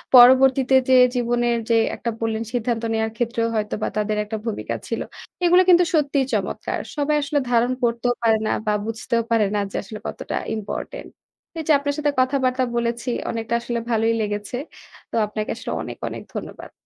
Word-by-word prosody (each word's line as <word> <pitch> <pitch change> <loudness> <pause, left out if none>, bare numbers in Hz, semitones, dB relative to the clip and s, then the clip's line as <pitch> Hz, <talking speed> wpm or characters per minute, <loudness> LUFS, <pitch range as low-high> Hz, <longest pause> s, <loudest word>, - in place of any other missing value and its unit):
পরবর্তীতে 260 +1 +7
যে 260 - +6 0.2
জীবনের 240 -1 +1
যে 230 - +4 0.2
একটা 235 - -3
বললেন 225 0 -1
সিদ্ধান্ত 235 -1 -1
নেয়ার 220 0 0
ক্ষেত্রেও 235 -1 0
হয়তোবা 210 0 -1
তাদের 210 0 0
একটা 220 +1 -4
ভূমিকা 225 - -3
ছিল। - - -2 0.4
এগুলা 360 +2 +6
কিন্তু 355 0 +7
সত্যিই 285 -3 +2
চমৎকার। - - -2 0.2
সবাই 295 +1 +1
আসলে 285 +1 0
ধারণ 240 +1 +3
করতেও 240 +1 +1
পারে 225 -1 +4
না - - +1 0.2
বা 210 - +3
বুঝতেও 230 +1 -1
পারে 220 -2 +4
না 205 - +2
যে - - -9
আসলে 210 +2 -8
কতটা - - -5 0.2
ইম্পর্টেন্ট। 220 - -6 0.5
এই - - -3
যে 315 - +4
আপনার 285 0 -1
সাথে 295 -1 +1
কথাবার্তা 255 -1 +2
বলেছি। 235 +1 -1 0.2
অনেকটা 225 0 -3
আসলে 240 0 -2
ভালই 225 0 +2
লেগেছে। 210 +3 -3 0.5
তো - - -4
আপনাকে 215 0 -4
আসলে - - -6
অনেক, - - -7
অনেক - - -7
ধন্যবাদ। - - -7
235 Hz, 170 wpm, -22 LUFS, 220-260 Hz, 0.5 s, পরবর্তীতে